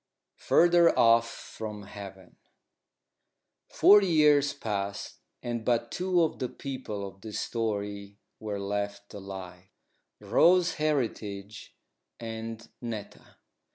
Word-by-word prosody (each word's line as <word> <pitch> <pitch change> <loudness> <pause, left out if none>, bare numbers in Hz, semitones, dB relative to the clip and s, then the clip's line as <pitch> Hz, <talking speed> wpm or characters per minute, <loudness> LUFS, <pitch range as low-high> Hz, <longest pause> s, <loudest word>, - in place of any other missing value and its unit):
FURTHER 175 0 +4
OFF 115 0 +5
FROM 105 -2 -8
HEAVEN 95 -2 -11 1.3
Forty 205 -1 +6
years 150 -4 +4
passed, 100 -6 -4 0.2
and 120 -2 -3
but 120 0 0
two 180 -1 +1
of 160 - -2
the 125 - -2
people 125 -7 -6
of 95 0 -14
this 110 -1 -5
story 100 -3 -3 0.2
were 105 -2 -4
left 100 +1 -4
alive 95 -2 -9 0.5
Rose 180 0 +4
Heritage 110 -9 -3 0.4
and 115 0 -6
Netta. 115 -4 -8
110 Hz, 100 wpm, -28 LUFS, 100-135 Hz, 1.3 s, Forty